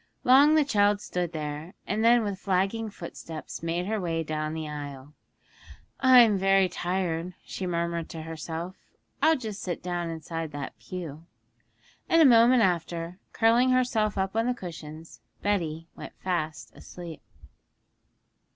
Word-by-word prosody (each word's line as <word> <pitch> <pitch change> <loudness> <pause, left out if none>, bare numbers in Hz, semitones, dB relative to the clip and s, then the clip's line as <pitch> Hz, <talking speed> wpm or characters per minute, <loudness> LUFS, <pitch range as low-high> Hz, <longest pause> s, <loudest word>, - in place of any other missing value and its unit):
Long 280 +5 +6
the 305 -2 +4
child 205 -5 +3
stood 180 -4 -3
there, 155 +2 -5
and 215 +2 -1
then 235 0 +5
with 200 -3 -3
flagging 195 +4 0
footsteps 165 -4 -8
made 170 +2 -2
her 215 +1 -1
way 165 -2 -1
down 155 0 -3
the 160 -1 -4
aisle. 145 -1 -7 0.9
'I'm 245 -6 +7
very 195 0 +4
tired,' 180 -1 -2
she 185 - -5
murmured 170 -1 -2
to 160 -1 -7
herself; 165 +3 -6 0.5
'I'll 320 0 +5
just 215 -6 -6
sit 175 -3 -4
down 175 -1 -2
inside 165 -1 -5
that 145 -2 -6
pew.' 165 -3 -7 0.8
And 330 - +5
a 320 - +8
moment 240 -1 +6
after, 175 -1 -1
curling 235 +3 +4
herself 240 -5 +1
up 190 +1 -1
on 225 +1 +1
the 250 - 0
cushions, 160 -5 -9 0.2
Betty 165 -6 -1
went - - -9
fast 160 -5 -3
asleep. 170 -3 -10
180 Hz, 140 wpm, -27 LUFS, 165-215 Hz, 0.9 s, a